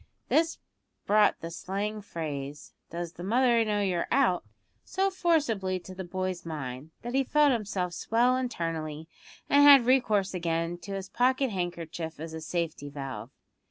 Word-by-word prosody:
This 325 +1 +2 0.5
brought 210 0 +4
the 165 - -5
slang 200 +4 -3
phrase, 145 -6 -6 0.2
"Does 170 0 -5
your 180 - -5
mother 240 0 +4
know 210 -1 0
you're 185 -4 0
out?" 240 -9 +3 0.4
so 390 +1 0
forcibly 280 - +1
to 185 +1 -11
the 190 0 -6
boy's 185 0 -3
mind, 140 -3 -6
that 240 +1 -5
he 270 +1 +3
felt 295 +2 +4
himself 200 -6 -1
swell 240 +7 +2
internally, 165 -10 -3 0.4
and 285 - +5
had 280 -4 +9
recourse 215 -7 +3
again 170 -1 -1
to 200 +3 -7
his 195 0 -4
pocket 255 +3 +1
handkerchief 170 -3 -4
as 160 +1 -6
a 160 - -6
safety 160 -3 -3
valve. 135 -6 -6
185 Hz, 155 wpm, -28 LUFS, 165-240 Hz, 0.5 s, had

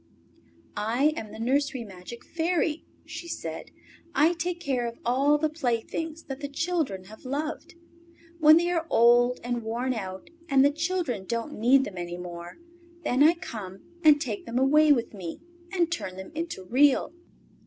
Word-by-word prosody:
"I 235 +9 +1
am 215 -7 -6
the - - -9
nursery 270 +2 0
magic 195 +3 -10
Fairy," 330 -1 -1 0.2
she 340 - -8
said. - - -6 0.5
"I 310 +5 +4
take 345 +1 -3
care 255 -7 -1
of 235 - -7
all 275 +5 +3
the 310 +1 +1
playthings 310 +3 -3
that 270 0 -7
the 285 - -4
children 285 - -2
have 215 +3 -14
loved. 300 +6 -4 0.6
When 310 0 +8
they 345 +1 +1
are 335 -2 -1
old 240 +2 +5
and 245 0 -2
worn 235 +4 -2
out 190 -4 -6 0.2
and 275 -1 +5
the 285 - +5
children 325 - -2
don't 235 +7 -3
need 260 +4 +5
them 185 -7 -6
any 175 0 -5
more, 175 -1 -8 0.5
then 255 +3 +1
I 320 +4 +7
come 195 - -8 0.2
and 300 -2 +7
take 235 -8 -4
them 230 +1 -2
away 300 +4 +5
with 240 -6 +2
me 180 -5 -7 0.3
and 345 -3 +1
turn 190 - -4
them 190 +7 -8
into 320 - -4
Real." 265 - +3
265 Hz, 165 wpm, -27 LUFS, 225-310 Hz, 0.6 s, When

